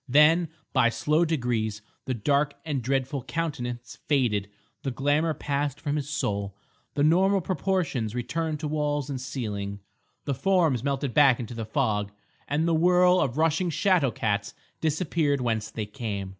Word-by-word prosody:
Then, 155 +5 +5 0.2
by 130 -3 +4
slow 150 +7 +1
degrees, 115 -9 -1 0.2
the 130 - -1
dark 140 +5 +1
and 145 -5 -1
dreadful 135 +2 -1
countenance 125 -5 -4
faded, 115 -9 +1 0.3
the 135 - -2
glamour 145 +5 +1
passed 140 0 -2
from 145 -1 -2
his 145 -2 -3
soul, 100 -9 -2 0.4
the 145 - +2
normal 190 +6 +4
proportions 175 - -1
returned 155 +5 -2
to 155 - -2
walls 145 -2 -1
and 130 -2 -4
ceiling, 100 -6 -4 0.5
the 140 - 0
forms 155 - +2
melted 140 -2 -1
back 140 -5 +5
into 120 -1 -5
the 115 -1 -4
fog, 105 -4 0 0.4
and 155 +3 +1
the 170 - +2
whirl 180 +2 +5
of 135 -2 -1
rushing 160 +3 +2
shadow 180 -4 +2
cats 105 -3 -2 0.3
disappeared 155 -2 +1
whence 115 -4 -1
they 110 - -4
came. 105 -4 -4
140 Hz, 155 wpm, -26 LUFS, 120-155 Hz, 0.5 s, Then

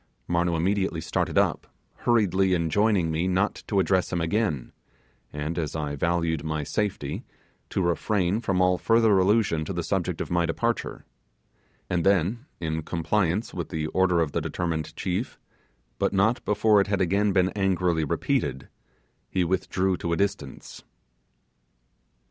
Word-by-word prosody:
Marnoo 85 0 +1
immediately 95 0 0
started 80 -1 -2
up, - - +1 0.3
hurriedly 95 -5 +2
enjoining 90 +1 +2
me 80 +3 0
not 95 +3 0
to 100 - +1
address 95 -1 +1
him 85 - 0
again, 80 - -1 0.6
and 75 +3 -3
as 75 -2 -3
I 75 -2 -3
valued 85 0 0
my 80 -1 -2
safety, 105 +6 -2 0.5
to 95 - -1
refrain 95 +3 0
from 95 -5 0
all 90 0 +3
further 115 -2 +4
allusion 95 -4 +2
to - - -4
the - - -2
subject - - -1
of - - -4
my 85 -1 +2
departure; - - -2 0.8
and 85 -2 0
then, 100 - +1
in 80 -1 -2
compliance 85 +5 -1
with 85 -3 -4
the 80 -1 -2
order 90 -1 +2
of 80 -3 0
the - - -1
determined 80 -2 -3
chief, 95 +6 -3 0.6
but - - +1
not 100 +5 +2
before 105 0 +4
it 100 - -1
had 100 -1 0
again 100 +3 +2
been 95 -1 +3
angrily 90 -4 +1
repeated, 65 -2 -1 0.6
he 90 - +1
withdrew 95 +1 0
to 85 0 -2
a - - 0
distance. 100 0 -3
90 Hz, 150 wpm, -26 LUFS, 80-100 Hz, 0.8 s, further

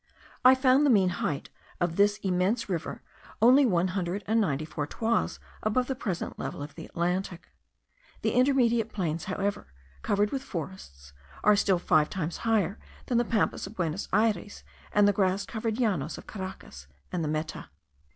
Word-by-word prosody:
I 255 +1 +8
found 260 +2 +4
the 290 - +4
mean 195 -6 +5
height 140 -1 -2 0.3
of 175 -1 0
this 205 +1 +3
immense 190 +5 +1
river 175 -5 -4 0.4
only 255 +5 +6
one 180 -3 +2
hundred 185 +1 -2
and 225 +2 +2
ninety 155 -6 0
four 150 -1 -4
toises 225 +7 -1 0.2
above 235 +4 +1
the 265 - -2
present 195 -9 -4
level - - -4
of 145 0 -9
the - - -9
Atlantic. 180 +1 -2 0.7
The - - +2
intermediate 240 -4 +3
plains, 165 -6 -2
however, 195 - -2 0.3
covered 205 - +1
with 270 - -2
forests, 140 - -8 0.3
are 210 0 +6
still 195 -2 +3
five 155 -3 +3
times 175 -4 -3
higher 215 -4 0 0.3
than 240 -2 +1
the 240 - +1
Pampas 220 -3 0
of 210 - -11
Buenos 170 0 -2
Ayres, 210 -2 0 0.3
and 205 -1 +5
the 205 - +4
grass 195 0 +1
covered 225 +1 -3
Llanos 205 - 0
of - - -11
Caracas 185 - -8 0.2
and 175 -2 -1
the - - -1
Meta. 155 - -4
195 Hz, 170 wpm, -28 LUFS, 170-225 Hz, 0.7 s, I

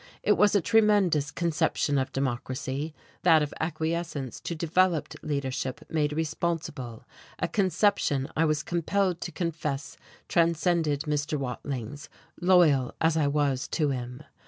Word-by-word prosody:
It - - +3
was 210 0 +4
a 200 - +4
tremendous 200 -8 +3
conception 155 -3 0
of 130 - -2
Democracy, 130 +3 -3 0.3
that 160 -3 +5
of 145 - -4
acquiescence 160 -5 -3
to 170 - -4
developed 170 -1 +1
leadership 135 -3 -3
made 150 -2 +1
responsible; 155 -6 -3 0.3
a - - -1
conception 185 -7 +1
I 160 - +3
was 155 -1 0
compelled 180 +1 0
to - - -4
confess 155 -5 -3 0.3
transcended 165 -3 +2
Mr. 150 0 -1
Watling's, 135 +1 -5 0.3
loyal 170 -8 +4
as 160 0 +2
I 155 -3 +2
was 140 -2 0
to 150 -4 0
him.... 125 +1 -5
155 Hz, 130 wpm, -27 LUFS, 140-170 Hz, 0.3 s, that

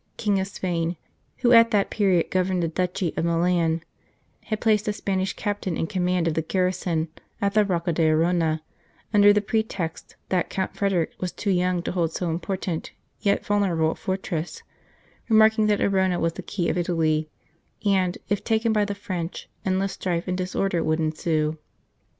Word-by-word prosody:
King 205 -3 +1
of 190 - -1
Spain, 175 -3 -2 0.4
who 245 -1 +2
at 230 -1 +8
that 205 -2 +1
period 190 -6 +2
governed 185 -1 +1
the - - +1
duchy 180 +1 -1
of - - -1
Milan, 170 -1 +1 0.6
had 215 -1 -2
placed 215 -2 +2
a 210 - +1
Spanish 190 -2 -1
Captain 205 -4 -3
in - - 0
command 180 -2 0
of 165 - +1
the 160 - 0
garrison 180 -1 0 0.3
at 200 0 0
the 215 0 +5
Rocca 175 -3 -1
d 160 0 +3
Arona, 160 0 +2 0.5
under 205 0 +7
the 210 0 +3
pretext 205 -6 -3
that 185 -2 +1
Count 190 -1 -3
Frederick 190 -5 0
was 180 -1 -2
too 200 - -2
young 180 -1 +1
to - - -2
hold 170 -3 0
so 175 -2 -2
important 175 0 -3 0.3
yet 200 -1 +1
vulnerable 180 -6 +2
a - - -6
fortress, 185 -4 -4 0.7
remarking 220 0 +5
that 210 -1 +2
Arona 190 -2 +2
was 165 0 0
the - - -7
key 180 -4 -2
of 180 - 0
Italy, 160 -3 0 0.6
and, 190 -3 +2
if 205 -1 -1
taken 225 0 +1
by 210 -1 +3
the 205 0 -4
French, 180 -4 -5
endless 190 +1 0
strife 175 -1 -2
and 180 - 0
disorder 185 -1 -1
would 155 0 +1
ensue. 155 0 0
185 Hz, 175 wpm, -24 LUFS, 165-200 Hz, 0.7 s, at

